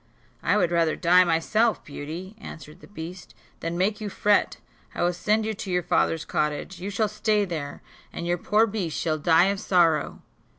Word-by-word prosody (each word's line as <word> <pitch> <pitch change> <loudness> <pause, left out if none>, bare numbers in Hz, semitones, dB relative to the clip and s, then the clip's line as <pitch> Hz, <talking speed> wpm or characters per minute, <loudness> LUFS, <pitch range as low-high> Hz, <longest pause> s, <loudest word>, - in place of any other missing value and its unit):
"I 205 - +2
would 175 -4 +2
rather 165 -2 +2
die 180 +1 +5
myself, 195 +7 +1
Beauty," 165 +7 -7
answered 150 -1 -10
the - - -15
beast, 180 -1 -9 0.2
"than 165 +1 -3
make 205 +4 0
you 210 - -3
fret; 205 +1 +2 0.4
I - - -1
will 175 +1 +2
send 215 +5 0
you 220 - -1
to 200 -1 -7
your 180 -1 0
father's 165 0 +1
cottage, 150 +4 -2
you 195 - -4
shall 210 +2 0
stay 210 0 +1
there, 155 -6 -6 0.3
and 170 - -6
your 175 0 0
poor 215 +5 +3
beast 195 -8 -3
shall 155 -2 -1
die 165 +4 +4
of 200 0 -1
sorrow." 170 -7 +1
180 Hz, 185 wpm, -25 LUFS, 165-205 Hz, 0.4 s, die